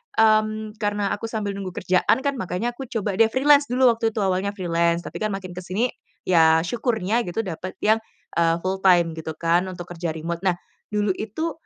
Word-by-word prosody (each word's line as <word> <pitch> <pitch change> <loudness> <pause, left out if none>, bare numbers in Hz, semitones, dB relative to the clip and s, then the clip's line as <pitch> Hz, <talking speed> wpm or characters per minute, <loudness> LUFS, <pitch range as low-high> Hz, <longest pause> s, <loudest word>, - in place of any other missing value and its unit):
mmm, 215 0 +2
karena 205 -1 -1
aku 225 - -3
sambil 215 -3 -3
nunggu 195 -2 -6
kerjaan 185 +8 +2
kan, 280 -3 -1
makanya 190 +5 -2
aku 260 +1 -8
coba 205 -3 -3
deh 225 - +7
freelance 285 +4 +4
dulu, 250 0 +4
waktu 225 -1 -1
itu 215 - 0
awalnya 190 +2 0
freelance, 170 -2 0
tapi - - -7
kan 215 - 0
makin 185 -2 -7
ke 175 - -7
sini 195 +7 -1 0.3
ya 160 -2 +4
syukurnya 225 +1 0
gitu 225 +6 -2
dapat 185 0 -6
yang, 220 +1 +4 0.4
eee 165 -1 +3
full 190 +1 -1
time 175 -3 +5
gitu 160 0 -5
kan 170 +2 +2
untuk 175 -1 -8
kerja 170 -1 -2
remote. 165 +1 -4
Nah 190 - +4 0.4
dulu 210 -1 +1
itu, 220 +12 -3
200 Hz, 195 wpm, -23 LUFS, 175-225 Hz, 0.4 s, deh